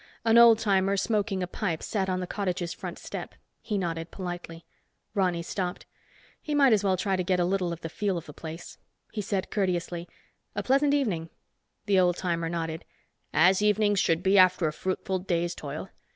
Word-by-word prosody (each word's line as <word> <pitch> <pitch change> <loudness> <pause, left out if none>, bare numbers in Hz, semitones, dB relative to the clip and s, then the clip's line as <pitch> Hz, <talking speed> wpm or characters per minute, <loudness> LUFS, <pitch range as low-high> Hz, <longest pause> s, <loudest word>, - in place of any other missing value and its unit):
An 225 +1 +6
old 235 -1 +8
timer 200 -2 +2
smoking 200 -2 0
a - - -2
pipe, 175 -3 -3
sat 195 -3 -1
on 185 0 -1
the - - -2
cottage's 180 -3 -2
front - - -7
step. - - -7 0.3
He 210 - -2
nodded 165 -3 -3
politely. 175 -3 -7 0.5
Ronny 180 -4 +1
stopped. 180 0 -4 0.6
He 300 - -2
might 275 -4 +6
as 205 -2 +2
well 190 -2 +2
try 195 +1 0
to 185 - -1
get 180 0 +1
a 175 - +3
little 185 -1 0
of 170 0 -6
the - - -4
feel 195 +2 -1
of 165 - -6
the 150 - -10
place. 160 +3 -9 0.3
He 215 - -3
said 195 -2 -2
courteously, 180 -3 -1 0.5
"A - - -2
pleasant 280 +2 +3
evening." 185 - -1 0.6
The 200 -3 +3
old 180 -1 +3
timer 170 -2 -1
nodded. 165 -1 -3 0.5
"As 185 +5 +4
evenings 210 -1 +3
should 165 -1 +1
be 195 0 +5
after 185 -2 +5
a 155 - -2
fruitful 185 +2 -2
day's 175 -2 -1
toil. 150 +4 -6
185 Hz, 190 wpm, -27 LUFS, 170-205 Hz, 0.6 s, old